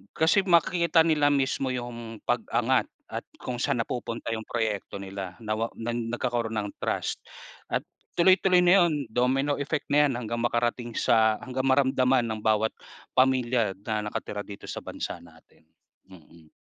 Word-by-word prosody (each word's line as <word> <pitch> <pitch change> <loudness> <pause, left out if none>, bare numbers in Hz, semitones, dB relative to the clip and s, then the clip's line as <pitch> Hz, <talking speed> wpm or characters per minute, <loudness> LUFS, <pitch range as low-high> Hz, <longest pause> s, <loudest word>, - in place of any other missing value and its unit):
kasi 165 +5 +4
makikita 170 -1 +4
nila 150 -3 +3
mismo 135 -1 0
yung 120 -2 -5
pag-angat - - +1 0.2
at - - -4 0.2
kung 125 -1 -4
saan 140 -3 +1
napupunta 115 -1 -4
yung 110 0 -4
proyekto 110 -4 -2
nila 95 -2 -6
na 110 - -1
wa 115 - 0
na 115 +1 -3
nagkakaroon 120 -1 -2
ng 105 -1 -2
trust. - - -2 0.5
At - - -1 0.3
tuloy-tuloy 185 0 +5
na 180 +1 +6
yon, 150 -5 0
domino 130 +4 +1
effect 140 +1 -2
na 150 0 +6
yan, 130 - -2
hanggang 115 -1 -3
makarating 120 0 -1
sa 110 -1 +4
hanggang 130 +1 -2
maramdaman 130 -1 +3
ng 110 -1 -3
bawat 110 0 +2 0.4
pamilya 125 -5 +2
na 110 -1 -1
nakatira 105 0 -4
dito 100 -1 -10
sa - - -5
bansa - - -5
natin. 80 -1 -20 0.5
Mm. 80 -3 -17
120 Hz, 150 wpm, -27 LUFS, 110-135 Hz, 0.5 s, na